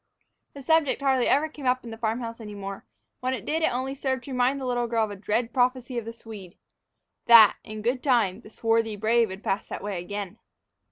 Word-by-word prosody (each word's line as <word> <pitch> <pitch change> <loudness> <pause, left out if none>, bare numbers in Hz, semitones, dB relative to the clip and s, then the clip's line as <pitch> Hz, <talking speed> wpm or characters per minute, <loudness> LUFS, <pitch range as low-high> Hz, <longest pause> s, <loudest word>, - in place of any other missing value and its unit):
The 280 - -9
subject 320 -1 +2
hardly 265 -3 +2
ever 290 +3 +3
came 295 -4 -7
up 255 0 +1
in 235 - -8
the 225 - -7
farm 225 +1 -1
house 230 0 -6
any 210 -2 -8
more; 195 -1 -7 0.3
when 255 +1 -1
it 220 - -9
did, 320 +2 -1
it - - +2
only 260 +2 -2
served 265 -2 -2
to 280 - -9
remind 255 +2 +1
the 265 - -5
little 245 -1 0
girl 230 -1 +1
of 210 - -8
a - - -6
dread 220 +4 -2
prophecy 250 0 0
of 225 - -9
the 230 - -5
Swede, 215 -6 -11 0.7
that, 230 -3 +8
in 215 0 -8
good 250 +2 0
time, 230 -7 +2
the 215 - -14
swarthy 225 0 0
brave 225 +3 +2
would 190 +2 -8
pass 195 +2 -1
that - - -6
way 200 -3 -3
again! 200 +1 -6
235 Hz, 230 wpm, -26 LUFS, 215-255 Hz, 0.7 s, that